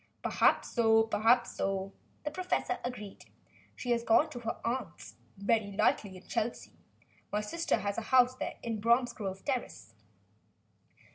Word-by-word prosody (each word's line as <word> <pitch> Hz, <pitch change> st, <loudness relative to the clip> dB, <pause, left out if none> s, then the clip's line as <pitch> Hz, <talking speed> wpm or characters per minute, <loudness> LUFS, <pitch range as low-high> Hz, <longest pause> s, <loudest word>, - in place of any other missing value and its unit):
"Perhaps -, -, +2 dB
so 225 Hz, -1 st, +4 dB
perhaps 230 Hz, +2 st, +2 dB
so," 195 Hz, 0 st, -2 dB, 0.3 s
the 300 Hz, -, -1 dB
professor 365 Hz, +4 st, -1 dB
agreed. 210 Hz, -5 st, -7 dB, 0.5 s
"She 245 Hz, -, -3 dB
has 235 Hz, -1 st, +2 dB
gone 295 Hz, +8 st, +4 dB
to 245 Hz, -, -6 dB
her 230 Hz, -1 st, -4 dB
aunt's, 245 Hz, +3 st, -4 dB, 0.2 s
very 200 Hz, 0 st, +1 dB
likely, 195 Hz, -1 st, +1 dB
in 185 Hz, -, -15 dB
Chelsea. 230 Hz, +2 st, -3 dB, 0.6 s
My 210 Hz, -, 0 dB
sister 330 Hz, +11 st, 0 dB
has 200 Hz, +2 st, -2 dB
a 225 Hz, -, -9 dB
house 255 Hz, -1 st, +5 dB
there -, -, -5 dB
in 225 Hz, -2 st, -3 dB
Bromsgrove 230 Hz, -5 st, 0 dB
Terrace." 245 Hz, -, -3 dB
230 Hz, 140 wpm, -31 LUFS, 205-245 Hz, 0.6 s, house